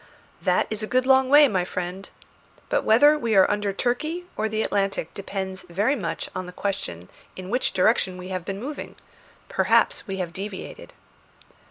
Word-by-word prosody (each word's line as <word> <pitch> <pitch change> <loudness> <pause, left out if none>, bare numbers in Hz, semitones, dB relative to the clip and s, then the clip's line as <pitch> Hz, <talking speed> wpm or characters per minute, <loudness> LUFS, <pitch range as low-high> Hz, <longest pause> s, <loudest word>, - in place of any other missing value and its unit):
"That - - +2
is 215 0 -2
a 215 - -3
good 255 +2 +1
long 265 0 +4
way, 290 +1 +8
my 190 -7 0
friend. 180 +1 -5 0.6
But - - +1
whether 290 +7 +5
we 230 -4 0
are 190 - +7
under 205 -1 0
Turkey 305 - -2
or 220 +1 -1
the 220 0 -1
Atlantic 195 -5 -1
depends 190 -1 -5
very 205 +11 +1
much 165 - -3
upon 185 -1 -6
the - - -8
question 180 - -4 0.3
in 185 +1 -8
what 250 +2 +1
direction 185 -1 +2
we 180 +1 -8
have 185 -2 -3
been 195 +2 -5
moving. 280 +6 -6 0.5
Perhaps - - +2
we 195 -1 -4
have 175 -3 -4
deviated." 195 +1 -7
200 Hz, 175 wpm, -24 LUFS, 185-240 Hz, 0.6 s, way